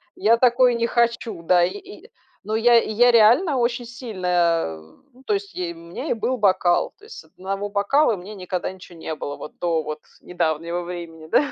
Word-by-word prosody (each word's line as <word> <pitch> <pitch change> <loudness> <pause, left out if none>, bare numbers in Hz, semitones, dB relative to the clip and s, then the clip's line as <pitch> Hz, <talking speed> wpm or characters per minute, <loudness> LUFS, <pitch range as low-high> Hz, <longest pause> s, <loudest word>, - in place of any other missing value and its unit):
я 230 +2 +3
такое 245 0 +4
не 235 0 0
хочу, 235 -6 0
да",- 175 +1 +4
и 175 - -1
и 405 0 -13 0.3
Но 215 +1 -3
я 235 +1 +5
и - - -4
я 245 +3 +5
реально 245 - +5
очень 240 0 0
сильно, 230 -6 -6 0.9
м 260 +2 -20
то - - 0
есть 400 -1 -3
и 175 -2 -3
мне 170 - -7
и - - +4
был 235 +3 -2
бокал, 185 -4 +2
то 415 - -28
есть 435 - -12
с - - -12
1 195 +2 -5
бокала 215 +6 +2
мне 195 +3 -9
никогда 180 -1 -4
ничего 185 -2 -14
не 160 - -5
было 145 -1 -5
вот - - -11
до 165 -2 0
вот 155 0 -5
с - - -25
недавнего 170 0 -2
времени, 170 -2 -8
да. 285 - +2
210 Hz, 205 wpm, -22 LUFS, 175-240 Hz, 0.9 s, я